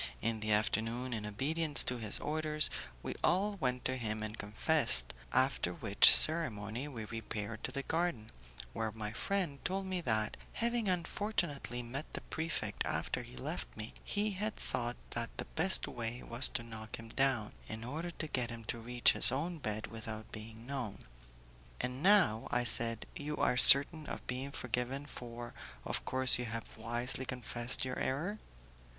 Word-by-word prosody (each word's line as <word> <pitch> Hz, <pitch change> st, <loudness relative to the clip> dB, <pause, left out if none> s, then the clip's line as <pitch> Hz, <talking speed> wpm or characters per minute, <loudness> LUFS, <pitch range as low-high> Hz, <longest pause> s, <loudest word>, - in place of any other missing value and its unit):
In 115 Hz, 0 st, -1 dB
the 110 Hz, 0 st, -2 dB
afternoon, 115 Hz, +3 st, 0 dB
in 105 Hz, -2 st, -4 dB
obedience 150 Hz, +8 st, +2 dB
to 125 Hz, -, -2 dB
his 110 Hz, -3 st, +2 dB
orders, 155 Hz, 0 st, 0 dB, 0.3 s
we -, -, -4 dB
all 200 Hz, +3 st, +1 dB
went 125 Hz, -4 st, -2 dB
to 130 Hz, 0 st, -1 dB
him 110 Hz, -3 st, -3 dB
and 110 Hz, 0 st, -5 dB
confessed, 100 Hz, -, +1 dB, 0.2 s
after 130 Hz, +1 st, +1 dB
which 110 Hz, -11 st, +7 dB
ceremony 125 Hz, -6 st, +3 dB
we 115 Hz, -7 st, -7 dB
repaired 110 Hz, 0 st, -6 dB
to -, -, -3 dB
the 140 Hz, -, -4 dB
garden, 160 Hz, -10 st, -2 dB, 0.4 s
where 110 Hz, -1 st, -3 dB
my 105 Hz, -1 st, -5 dB
friend 165 Hz, -, -2 dB
told 190 Hz, +1 st, -2 dB
me 185 Hz, -1 st, -2 dB
that, 110 Hz, -7 st, -1 dB, 0.2 s
having 235 Hz, -3 st, 0 dB
unfortunately 170 Hz, -, -2 dB
met 135 Hz, +6 st, -7 dB
the -, -, -4 dB
prefect 160 Hz, 0 st, -3 dB
after -, -, -2 dB
he 60 Hz, -, -12 dB
left 65 Hz, -, -4 dB
me, 110 Hz, +1 st, -6 dB
he 210 Hz, +1 st, -1 dB
had 210 Hz, +3 st, -3 dB
thought 120 Hz, 0 st, -4 dB
that 115 Hz, 0 st, -4 dB
the -, -, -4 dB
best 185 Hz, +4 st, +2 dB
way 120 Hz, +1 st, -5 dB
was 115 Hz, +2 st, +2 dB
to 120 Hz, -, -3 dB
knock 110 Hz, -1 st, -8 dB
him 115 Hz, 0 st, -11 dB
down, 130 Hz, -4 st, 0 dB
in 110 Hz, +1 st, -7 dB
order 155 Hz, +8 st, -5 dB
to 170 Hz, -, -6 dB
get 125 Hz, -5 st, -2 dB
time 115 Hz, -1 st, -8 dB
to 115 Hz, +1 st, -4 dB
reach 120 Hz, +1 st, +3 dB
his -, -, +3 dB
own 165 Hz, +5 st, -3 dB
bed 110 Hz, -4 st, -4 dB
without 110 Hz, -1 st, -8 dB
being 110 Hz, +1 st, -10 dB
known. 130 Hz, -6 st, -6 dB, 0.7 s
"And 125 Hz, +2 st, -3 dB
now," 180 Hz, -, +4 dB
I 120 Hz, 0 st, +1 dB
said, 115 Hz, -1 st, 0 dB
"you 150 Hz, +1 st, -5 dB
are -, -, +2 dB
certain 140 Hz, +4 st, +11 dB
of -, -, -7 dB
being 130 Hz, +2 st, -4 dB
forgiven, 125 Hz, +2 st, -3 dB
for, 120 Hz, -3 st, -8 dB, 0.3 s
of -, -, -3 dB
course, 130 Hz, -1 st, +4 dB
you 125 Hz, -, -3 dB
have 115 Hz, 0 st, -6 dB
wisely 120 Hz, +3 st, -2 dB
confessed 125 Hz, -1 st, -2 dB
your 130 Hz, -, -4 dB
error?" 175 Hz, +11 st, -2 dB
125 Hz, 170 wpm, -33 LUFS, 110-150 Hz, 0.7 s, certain